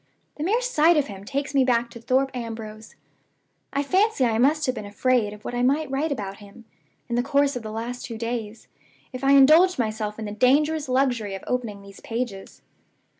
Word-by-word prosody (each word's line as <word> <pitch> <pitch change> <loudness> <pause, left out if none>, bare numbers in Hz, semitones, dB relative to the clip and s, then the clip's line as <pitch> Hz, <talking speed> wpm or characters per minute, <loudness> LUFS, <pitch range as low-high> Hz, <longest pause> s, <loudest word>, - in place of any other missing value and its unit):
The 300 - -4
mere 435 +8 +1
sight 335 -9 +3
of 295 - +2
him 200 -3 -10
takes 280 +4 -3
me 275 -1 +4
back 240 -2 +1
to 235 -1 -11
Thorpe 265 +3 +1
Ambrose. 220 -2 -7 0.8
I 280 - 0
fancy 380 - +2
I 225 -2 +1
must 300 +4 +3
have 255 - 0
been 225 - -6
afraid 225 +1 +1
of 210 0 -13
what - - -4
I 245 - -1
might 280 +3 +1
write 290 +3 -1
about 200 -7 -4
him, 210 +3 -15 0.4
in 240 - -5
the 240 - +2
course 280 +1 +1
of 245 - -4
the 220 - -7
last 235 +3 -5
two 230 -2 -6
days, 230 -1 -5 0.5
if 255 +1 -7
I 275 +1 +4
indulged 310 +7 +6
myself 215 -3 -2
in 220 - -5
the 205 - -5
dangerous 285 +6 +2
luxury 245 -6 0
of 195 - -9
opening 225 -5 -3
these 200 -1 -13
pages. 225 -4 -6
245 Hz, 205 wpm, -24 LUFS, 220-280 Hz, 0.8 s, indulged